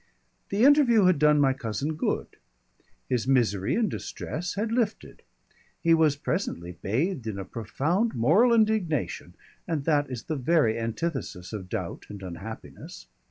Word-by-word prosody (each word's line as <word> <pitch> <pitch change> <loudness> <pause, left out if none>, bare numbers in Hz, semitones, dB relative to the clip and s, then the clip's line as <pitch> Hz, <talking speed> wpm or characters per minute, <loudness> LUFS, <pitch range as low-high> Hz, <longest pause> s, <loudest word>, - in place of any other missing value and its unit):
The 200 +3 +1
interview 265 -8 +6
had 180 -5 +4
done 150 0 +5
my 135 -2 +4
cousin 130 +4 -3
good. - - -1 0.8
His 125 -1 -1
misery 110 -8 +2
and 230 -2 +2
distress 175 -2 -5
had 215 +2 -2
lifted. 230 -3 -2 0.6
He 165 - +3
was 160 -3 +4
presently 140 - -3
bathed 130 - -1
in 105 -3 -3
a 95 - -5
profound 155 - -1
moral 165 - +4
indignation, 215 - 0 0.3
and 160 -5 -1
that 145 -3 +2
is 125 -3 -5
the 155 - -3
very 135 -5 +2
antithesis 115 - -4
of 95 -4 -6
doubt - - -5
and 100 -2 -9
unhappiness. 95 +5 -9
145 Hz, 145 wpm, -27 LUFS, 115-185 Hz, 0.8 s, interview